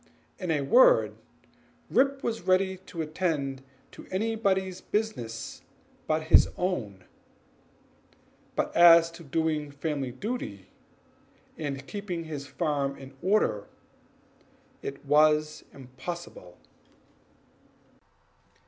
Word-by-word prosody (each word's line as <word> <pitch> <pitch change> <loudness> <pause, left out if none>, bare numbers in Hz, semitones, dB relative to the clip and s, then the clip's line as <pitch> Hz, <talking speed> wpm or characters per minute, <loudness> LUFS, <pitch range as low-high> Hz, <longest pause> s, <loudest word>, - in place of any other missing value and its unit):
In 180 -3 -4
a 155 -3 +1
word, 135 - +5 0.7
Rip 275 +1 +2
was 230 -1 -2
ready 190 +1 +2
to 165 -2 -4
attend 150 -5 -2 0.3
to - - -13
anybody's 190 -3 0
business 165 - -3 0.5
but 155 0 +1
his 155 - +6
own; 110 - -2 1.5
but - - -1
as 170 -1 +8
to 165 0 -12
doing 155 0 -1
family 140 -2 -3
duty, 130 - -5 0.9
and 140 -3 -5
keeping 185 -2 -5
his 150 -3 -6
farm 140 -4 -1
in 135 0 -11
order, 185 - +1 1.1
he - - -3
found 150 +2 +4
it 155 0 -13
impossible. 130 - -9
160 Hz, 95 wpm, -28 LUFS, 140-185 Hz, 1.5 s, as